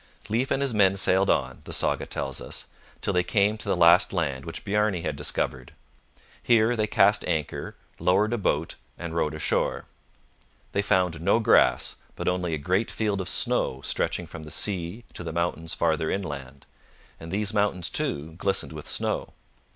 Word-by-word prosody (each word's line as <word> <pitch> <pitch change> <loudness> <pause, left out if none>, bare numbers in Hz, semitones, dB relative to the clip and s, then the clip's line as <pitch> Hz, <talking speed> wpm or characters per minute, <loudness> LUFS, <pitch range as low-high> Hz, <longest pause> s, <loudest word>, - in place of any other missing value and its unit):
Leif 120 +5 0
and 135 - +1
his 135 -4 -1
men 100 -2 +4
sailed 95 0 +3
on, 65 -2 0
the - - -8
saga - - +1
tells - - -4
us, - - -4 0.4
till - - 0
they 90 - +3
came 100 +3 +2
to 110 - -6
the - - +2
last 85 +2 +6
land 70 -7 -2
which 80 - -7
Bjarne 105 -3 +1
had 75 - -2
discovered. 65 -3 -3 0.7
Here 115 0 +3
they 110 -2 0
cast 100 0 +4
anchor, 80 -5 -3 0.2
lowered 100 +5 +2
a 120 - -1
boat, 80 -4 -1 0.2
and 85 -2 -6
rowed 75 -2 0
ashore. 75 - -1 0.9
They 100 - +1
found 90 -5 +1
no 85 - +3
grass, 110 - +3 0.2
but - - -5
only 90 -2 0
a - - -3
great 95 +9 0
field 105 -3 -1
of 90 - -3
snow 65 - +1
stretching - - -1
from 80 - -9
the 75 - -9
sea 95 +5 -2
to - - -6
the 85 - -4
mountains 80 -1 -1
farther 80 -1 +1
inland; 70 -8 -5 0.5
and 80 0 -9
these 105 +2 0
mountains, 95 -5 0
too, 75 +3 -2
glistened 100 -1 -1
with - - -8
snow. - - -1
90 Hz, 175 wpm, -26 LUFS, 80-105 Hz, 0.9 s, last